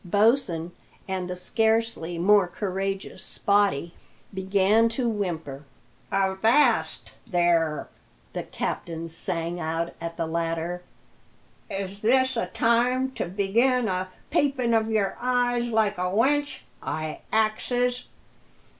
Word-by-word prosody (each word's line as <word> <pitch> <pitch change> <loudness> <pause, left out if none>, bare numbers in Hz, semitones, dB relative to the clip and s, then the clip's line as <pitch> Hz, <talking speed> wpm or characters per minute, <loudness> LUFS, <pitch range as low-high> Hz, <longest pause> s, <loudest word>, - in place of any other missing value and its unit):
Bosin 200 -4 +2 0.4
and 185 -1 -3
the 180 - -3
scarcely 220 -2 0
more 195 +2 +5
courageous 195 +1 -4
Spottie 200 -6 +1 0.4
began 195 +4 +3
to 240 +2 -1
whimper. 165 -10 -3 0.5
"Avast 195 +9 +2 0.2
there!" 170 -5 +1 0.5
the - - -2
captain 165 -1 -4
sang 165 +1 -3
out 165 +1 -2
at 170 0 -5
the 165 - -1
latter. 165 +1 -2 0.9
"Is 195 0 -5
this 260 +4 +3
a 230 - -1
time 250 +3 +2
to - - -3
begin 220 +7 +2
a 185 -1 -2 0.2
pipin' 260 -5 +1
of 220 -1 +2
your 210 -3 +1
eye 245 -1 +2
like 220 -5 +1
a 180 0 0
wench, 285 +9 +1 0.2
I 155 -1 -4
axes? 245 +3 +1
200 Hz, 110 wpm, -26 LUFS, 175-230 Hz, 0.9 s, more